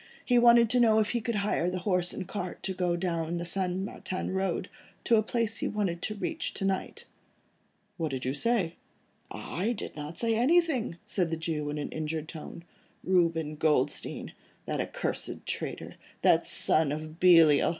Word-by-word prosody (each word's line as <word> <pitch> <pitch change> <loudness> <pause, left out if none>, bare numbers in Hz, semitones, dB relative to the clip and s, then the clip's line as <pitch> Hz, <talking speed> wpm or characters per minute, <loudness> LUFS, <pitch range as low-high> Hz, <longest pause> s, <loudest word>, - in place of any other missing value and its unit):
He 245 -2 +4
wanted 235 -1 +7
to 250 - +4
know 225 -2 +5
if 215 -1 +2
he 240 - -1
could 230 +1 -2
hire 170 - +1
a 185 - -2
horse 180 -1 +1
and 185 - -5
cart 185 -3 -5
to 190 - -2
go 180 -2 0
down 175 -1 -1
along 165 +1 -2
the 170 - -3
St. 180 0 0
Martin 185 -2 -4
Road, 190 -1 -1 0.4
to 230 - +4
a - - +4
place 225 0 -1
he - - -1
wanted 195 -5 -2
to 215 - -3
reach 320 +10 -3
to 195 - -1
night." 195 -1 -2 0.9
"What 165 -3 -1
did 130 -2 -4
you 130 - 0
say?" 185 0 0 0.5
"I 205 +8 -3
did 215 - -7
not 150 +2 -7
say 230 -1 +1
anything," 265 - +2
said 185 -5 0
the 165 - -2
Jew 155 -2 -3
in 150 - -3
an 150 - -3
injured 155 0 -3
tone, 165 +1 -9 0.4
"Reuben 165 -4 +1
Goldstein, 150 -3 0 0.3
that - - -1
accursed - - -3
traitor, - - -5 0.3
that - - +4
son 155 -2 +2
of 155 +2 -6
Belial. 165 -5 +6
180 Hz, 180 wpm, -29 LUFS, 160-215 Hz, 0.9 s, wanted